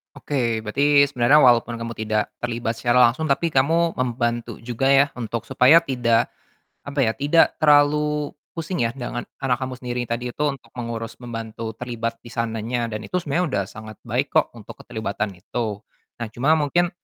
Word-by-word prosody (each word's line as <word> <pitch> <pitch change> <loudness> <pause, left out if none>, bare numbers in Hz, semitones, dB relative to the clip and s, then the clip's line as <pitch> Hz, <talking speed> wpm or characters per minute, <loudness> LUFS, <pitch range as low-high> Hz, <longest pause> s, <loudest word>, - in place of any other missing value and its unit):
Oke, 120 -6 -1
berarti 140 +6 +4
sebenernya 140 +4 +5
walaupun 120 -1 +4
kamu 115 0 -5
tidak 110 -1 -2
terlibat 115 -1 -3
secara 125 +1 +4
langsung 155 +6 -4
tapi 160 +4 +1
kamu 165 +4 +2
membantu 120 -2 -1
juga 120 +2 -1
ya, 140 +1 +6
untuk 115 -1 -3
supaya 135 +8 +5
tidak, 120 -5 +1 0.5
apa 140 -2 0
ya, 110 - +1
tidak 145 +5 +3
terlalu 150 0 +3 0.2
pusing 165 +2 -4
ya, 115 - +2
dengan 120 -1 -4 0.2
anak 130 -2 -1
kamu 130 -1 -4
sendiri 125 -1 -3
tadi 120 +1 -3
itu - - -6
untuk 135 -2 -9
mengurus, 115 -1 -6
membantu, 115 -1 -6
terlibat 115 -2 -4
di 120 - -10
sananya 115 +1 -2
dan 110 0 -5
itu 180 - -2
sebenernya 150 - 0
udah - - -2
sangat 110 -1 -10
baik - - -2
kok - - +3
untuk - - -10
keterlibatan 105 -2 -4
itu. 105 +2 -4 0.3
Nah, 120 - -4
cuma 150 +6 +3
mungkin 170 +4 +1
120 Hz, 170 wpm, -22 LUFS, 115-140 Hz, 0.5 s, ya